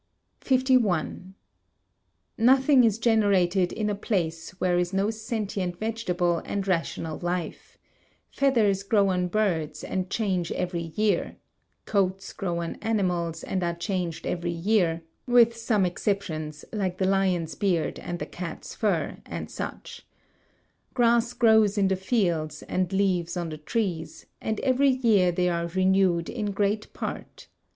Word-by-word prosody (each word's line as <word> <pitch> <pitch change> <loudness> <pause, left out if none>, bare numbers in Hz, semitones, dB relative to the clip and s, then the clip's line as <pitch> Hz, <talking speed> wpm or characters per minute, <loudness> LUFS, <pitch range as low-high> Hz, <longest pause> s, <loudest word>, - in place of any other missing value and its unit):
51. 235 - +1 1.0
Nothing 260 +3 +5
is 220 -3 +3
generated 200 -6 +2
in 215 - -2
a 210 - 0
place 175 -6 -2
where 175 -1 +2
is 180 +1 -1
no 195 +3 +1
sentient 215 -5 -3
vegetable 180 -6 0
and 200 -1 -3
rational 165 -3 -2
life; 175 -1 -4 0.5
feathers 225 -8 +2
grow 200 -1 +2
on 180 -1 0
birds 165 -7 -1
and 185 -1 -3
change 185 -7 -1
every 180 -1 -2
year; 215 -1 +1 0.5
coats 195 -1 0
grow 170 -3 -2
on 165 - -5
animals 180 -7 -1
and 185 - -2
are 170 0 -1
changed 175 -2 -3
every 175 -1 -2
year, 170 -1 +1 0.2
with 235 -1 +5
some 225 -4 +1
exceptions, 160 -5 -3
like 190 -4 -2
the 190 - +1
lion's 185 -4 +1
beard 175 +1 0
and 175 - -5
the - - -4
cat's 170 -2 -7
fur, - - -1
and - - -6
such; - - -7 0.9
grass 235 -1 +3
grows 220 -3 +4
in 195 -1 +3
the 190 - +2
fields 185 -6 -1
and 185 -1 -1
leaves 185 -3 0
on 170 -2 -2
the 155 - -6
trees; 175 -1 -3 0.2
and 220 -1 -2
every 270 +1 +3
year 225 -9 +3
they 180 +1 +1
are 170 -1 0
renewed 185 -1 +2
in 220 -4 -3
great 205 +1 -1
part. - - -6
190 Hz, 140 wpm, -26 LUFS, 175-215 Hz, 1.0 s, Nothing